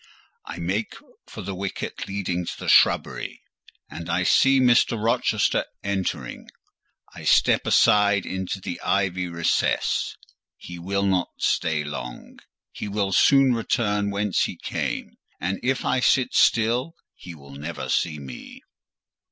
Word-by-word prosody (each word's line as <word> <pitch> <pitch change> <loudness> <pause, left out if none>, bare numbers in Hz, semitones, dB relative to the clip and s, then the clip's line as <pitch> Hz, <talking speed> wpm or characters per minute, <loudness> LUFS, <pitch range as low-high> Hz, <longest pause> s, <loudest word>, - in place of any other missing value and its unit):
I - - -7
make 95 +6 -2 0.3
for - - -9
the 100 +1 -5
wicket 95 +1 -5
leading 95 -3 -2
to - - -5
the - - -7
shrubbery, - - +2 0.4
and 85 0 -8
I 90 +2 +1
see 135 +8 +4
Mr. 120 -2 +3
Rochester 115 +2 +1 0.2
entering. 100 -2 -3 0.6
I - - -10
step - - +3
aside 100 -2 +4
into 95 +1 -4
the 90 - -6
ivy 95 -2 0
recess; 85 -1 0 0.4
he 90 0 -10
will 100 +3 -1
not 95 -2 +1
stay 80 -2 0
long: 65 -5 -8 0.3
he - - -6
will 100 -1 -1
soon 135 +5 +5
return 105 -3 0
whence 100 -1 0
he - - -5
came, - - -4 0.2
and 95 +2 -2
if 130 +1 -1
I 130 - +1
sit 130 0 +2
still 120 +8 +2 0.2
he 90 -2 -11
will 70 -2 -14
never 75 -1 -6
see 75 +4 0
me. 65 -3 -10
95 Hz, 135 wpm, -24 LUFS, 85-105 Hz, 0.6 s, soon